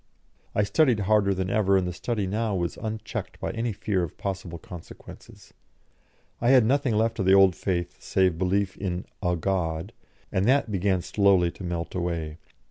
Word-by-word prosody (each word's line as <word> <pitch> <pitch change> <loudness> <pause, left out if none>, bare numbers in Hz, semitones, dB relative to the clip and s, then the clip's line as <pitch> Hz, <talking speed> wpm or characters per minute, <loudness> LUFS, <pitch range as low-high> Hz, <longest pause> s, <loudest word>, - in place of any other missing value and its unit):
I 105 - +3
studied 115 +2 +3
harder 100 0 +3
than 95 -1 -1
ever, 100 -2 +3
and 90 -1 0
the 90 - -3
study 105 +2 -2
now 105 +2 -1
was 85 -2 -2
unchecked 110 -1 -5
by - - -3
any 115 +1 -2
fear 100 -1 -1
of 85 -4 -5
possible 95 -4 -4
consequences. 85 0 -12 0.9
I 120 - +3
had 130 -4 +6
nothing 135 -1 +2
left 115 +1 +1
of 95 - 0
the 95 - +7
old 95 -2 +6
faith 90 -2 -3
save 95 -3 +2
belief 95 +1 0
in 90 -2 -3 0.2
"a 90 -2 +1
God," 85 +1 -2 0.4
and 95 +1 +1
that 130 -2 +3
began 95 -2 +1
slowly 95 -4 +3
to 95 - -11
melt 85 -1 -4
away. 85 -3 -3
95 Hz, 175 wpm, -26 LUFS, 90-105 Hz, 0.9 s, the